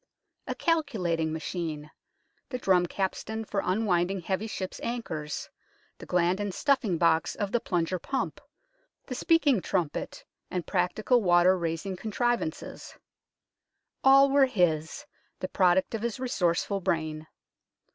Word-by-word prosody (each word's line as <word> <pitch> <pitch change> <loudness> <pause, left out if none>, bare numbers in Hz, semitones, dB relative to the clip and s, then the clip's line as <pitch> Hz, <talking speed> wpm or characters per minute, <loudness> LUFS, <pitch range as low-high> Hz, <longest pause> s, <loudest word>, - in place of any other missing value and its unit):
A - - -3
calculating 185 - 0
machine, 155 -2 -4 0.6
the 255 - -3
drum 185 -6 +3
capstan 220 +4 -3
for 200 -1 -1
up 185 +2 +1
winding 190 -3 +1
heavy 190 +5 -2
ships' 190 -4 -5
anchors, 160 -11 -4 0.5
the - - -10
gland 180 +2 +2
and 205 -1 -2
stuffing 235 - +1
box 165 -1 +2
of 205 -1 -3
the 240 - +2
plunger 180 -2 -1
pump, 265 +9 -3 0.6
the - - -5
speaking 285 - +3
trumpet, 175 -6 -3 0.2
and 180 -2 -3
practical 210 +6 +1
water 175 -1 +5
raising 170 +2 -3
contriv 235 +5 0
ances 315 - -7 1.1
all 275 +1 +7
were 275 -1 +5
his, 175 - 0 0.3
the - - -4
product 185 +1 +2
of 225 - -2
his 235 +1 -3
resourceful 195 -5 0
brain. 155 -3 -2
190 Hz, 130 wpm, -28 LUFS, 170-235 Hz, 1.1 s, all